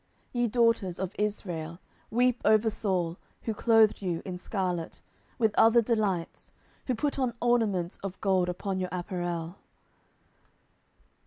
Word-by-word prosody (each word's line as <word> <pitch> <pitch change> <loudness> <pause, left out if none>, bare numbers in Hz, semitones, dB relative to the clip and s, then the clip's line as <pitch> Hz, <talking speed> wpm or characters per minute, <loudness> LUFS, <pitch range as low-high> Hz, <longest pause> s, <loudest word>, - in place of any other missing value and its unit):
10:001:024 240 - 0
Ye 240 - +3
daughters 230 -6 +2
of 190 0 -4
Israel, 175 -6 -3 0.3
weep 245 +1 +2
over 215 +1 +4
Saul, 180 -5 -1 0.3
who 225 - -1
clothed 225 -1 +4
you 175 -4 -2
in 185 - -4
scarlet, 180 -2 -3 0.4
with 220 -3 +2
other 225 +1 +7
delights, 210 -7 -1 0.4
who 255 - +1
put 285 +4 -1
on 250 -3 0
ornaments 215 -8 +1
of 195 -1 -6
gold 185 -3 +2
upon 190 +2 -3
your 185 -1 -2
apparel. 175 -1 -4
200 Hz, 135 wpm, -28 LUFS, 180-225 Hz, 0.4 s, other